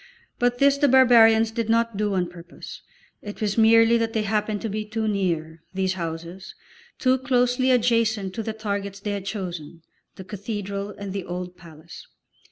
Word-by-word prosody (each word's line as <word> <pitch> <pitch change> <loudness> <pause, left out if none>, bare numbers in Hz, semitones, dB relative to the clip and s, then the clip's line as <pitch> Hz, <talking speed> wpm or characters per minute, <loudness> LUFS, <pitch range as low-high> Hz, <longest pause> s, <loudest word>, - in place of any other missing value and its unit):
But 245 0 +1
this 280 +1 +3
the 285 - +4
barbarians 230 -4 +6
did 225 -1 -3
not 230 -1 +1
do 205 -1 -1
on 180 -1 0
purpose; 170 0 -11 0.4
it 205 0 -8
was 210 -2 -1
merely 225 +1 +5
that 225 0 -1
they 220 - 0
happened 210 0 -1
to - - -1
be 215 +1 -3
too 220 +1 -3
near, 165 -6 -2
these 190 -1 0
houses, 170 +1 -7 0.4
too 260 0 +2
closely 250 0 +1
adjacent 230 -5 +1
to 225 - -4
the 220 0 -4
targets 200 -2 -4
they 205 +1 -4
had 200 -1 -5
chosen, 175 -5 -6 0.3
the 190 - -9
cathedral 200 0 -5
and 200 -1 -7
the 195 -2 -3
old 180 0 -6
palace. 160 -3 -13
210 Hz, 175 wpm, -24 LUFS, 190-230 Hz, 0.4 s, barbarians